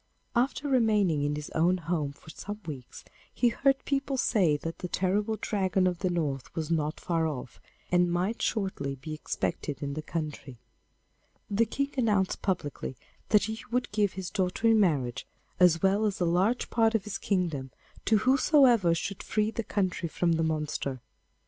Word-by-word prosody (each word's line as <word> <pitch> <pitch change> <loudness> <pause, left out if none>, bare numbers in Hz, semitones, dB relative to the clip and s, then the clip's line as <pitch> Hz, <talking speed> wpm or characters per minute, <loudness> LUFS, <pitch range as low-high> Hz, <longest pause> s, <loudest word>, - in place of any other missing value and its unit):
After 260 +4 +1
remaining 210 - +3
in 145 +1 0
his 150 0 -6
own 175 +3 +2
home 160 -4 -2
for 150 +2 -14
some 205 +6 -7
weeks, 135 -6 -8 0.3
he 240 - +2
heard 270 +3 +1
people 275 -1 -1
say 180 -12 +3
that 165 +3 -6
the 180 - -4
terrible 205 +5 0
Dragon 190 -2 +1
of 180 -2 0
the 185 -1 0
North 150 -7 -2
was 160 0 -3
not 155 -1 0
far 165 -2 0
off, 130 -5 -6 0.3
and 175 -1 +3
might 185 +6 -1
shortly 190 -10 -1
be 140 +4 -7
expected 150 -1 -3
in 140 0 -3
the 155 - -4
country. 150 -5 -5 0.9
The 220 +3 +3
King 280 0 -2
announced 210 -6 +1
publicly 150 -8 -2 0.3
that 210 -2 +5
he 220 +1 -3
would 245 +2 -1
give 205 -2 +1
his 185 -2 -5
daughter 185 +4 0
in 225 -1 +5
marriage, 140 - +1 0.3
as 175 -2 +5
well 200 +3 +3
as 200 - -3
a 175 - +2
large 185 +8 +1
part 225 -1 +3
of 215 - +1
his 210 - -5
kingdom, 165 -9 -1 0.4
to 220 - +4
whosoever 255 - +5
should 200 +3 -4
free 215 0 0
the 225 - -2
country 185 -5 -1
from 170 +2 +1
the 165 0 +2
monster. 150 -4 -2
185 Hz, 175 wpm, -29 LUFS, 155-215 Hz, 0.9 s, that